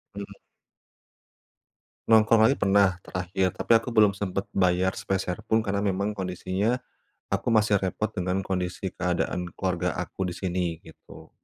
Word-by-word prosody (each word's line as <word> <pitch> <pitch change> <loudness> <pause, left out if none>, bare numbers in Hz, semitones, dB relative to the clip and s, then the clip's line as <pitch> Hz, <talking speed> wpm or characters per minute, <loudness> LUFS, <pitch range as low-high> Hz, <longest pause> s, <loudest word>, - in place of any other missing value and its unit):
Mhm. 100 0 -8 1.7
Nongkrong 110 0 +5
lagi 135 - +3
pernah, 100 -4 +3
terakhir. 90 +1 -1
Tapi - - -4
aku 115 +2 +1
belum 105 -3 +4
sempat 100 -1 -3
bayar 95 0 +2
sepeser 95 -2 -3
pun, 110 - +2
karena 100 -2 -1
memang 100 +1 -1
kondisinya, 95 +5 -1 0.5
aku - - -1
masih 105 -3 +3
repot 100 +3 -2
dengan 95 -1 -2
kondisi 90 0 -3
keadaan 90 0 -2
keluarga 90 -3 -1
aku 95 - -3
di 90 - -5
sini, 90 -3 -2
gitu. - - -15
95 Hz, 135 wpm, -26 LUFS, 90-105 Hz, 1.7 s, Nongkrong